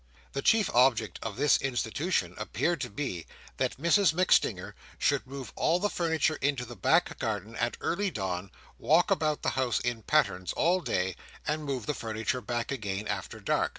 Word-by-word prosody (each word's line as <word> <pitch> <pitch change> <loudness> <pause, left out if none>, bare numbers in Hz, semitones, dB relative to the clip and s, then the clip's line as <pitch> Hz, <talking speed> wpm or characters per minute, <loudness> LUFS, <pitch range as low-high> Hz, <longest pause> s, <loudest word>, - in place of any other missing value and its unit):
The 140 - -2
chief 220 +2 +4
object 120 -6 +3
of 110 -3 -4
this 145 +2 +4
institution 135 +6 -1
appeared 170 -4 -1
to - - -3
be, 100 - -4 0.3
that - - -1
Mrs 170 +4 +3
MacStinger 105 - +2 0.2
should 140 -2 +1
move 135 -1 -8
all 170 - +2
the 205 +2 0
furniture 160 -2 +1
into 140 -3 0
the 120 +1 -9
back 165 - +2
garden 110 -1 -3
at 120 0 -1
early 200 +4 0
dawn, 95 - -3 0.3
walk 165 +4 +3
about 155 -1 +1
the - - +2
house 130 -3 0
in 120 -2 -2
pattens 95 -11 +1
all 180 +2 +2
day, 95 - -1 0.3
and 150 0 -1
move 130 -6 -3
the 150 - -1
furniture 115 +1 -2
back 120 +2 -3
again 105 -5 -3
after - - -4
dark. - - +1
130 Hz, 175 wpm, -29 LUFS, 110-155 Hz, 0.3 s, chief